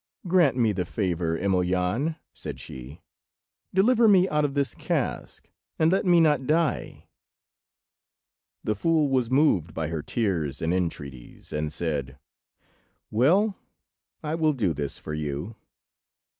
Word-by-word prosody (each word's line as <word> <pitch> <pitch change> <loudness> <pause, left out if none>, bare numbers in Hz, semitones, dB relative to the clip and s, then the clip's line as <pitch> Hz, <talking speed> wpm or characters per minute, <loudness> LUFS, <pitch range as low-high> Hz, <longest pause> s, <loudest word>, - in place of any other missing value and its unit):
"Grant 170 -7 +3
me 115 -3 +3
the 95 -3 -1
favour, 85 -4 -1
Emelyan," 95 - 0 0.2
said - - -7
she; 65 +4 -10 0.7
"deliver 225 +5 +4
me 190 -3 +5
out 150 0 +1
of 145 -1 -1
this 140 -1 0
cask, - - -3 0.3
and 160 +1 +3
let 190 0 +1
me 175 -1 +6
not 150 -5 +3
die." 160 0 -1 1.6
The 105 - 0
fool 155 +6 +1
was 130 -3 +1
moved 125 - +2
by 80 -1 -2
her 80 -2 -3
tears 80 - -2
and 80 +2 0
entreaties, 70 -8 -5
and 75 0 -2
said— 70 -6 -3 0.9
"Well, 185 - +3 0.7
I 150 0 -2
will 160 -2 +2
do 105 - 0
this 70 -1 -4
for 75 - -7
you." 75 +7 -4
105 Hz, 130 wpm, -26 LUFS, -, 1.6 s, me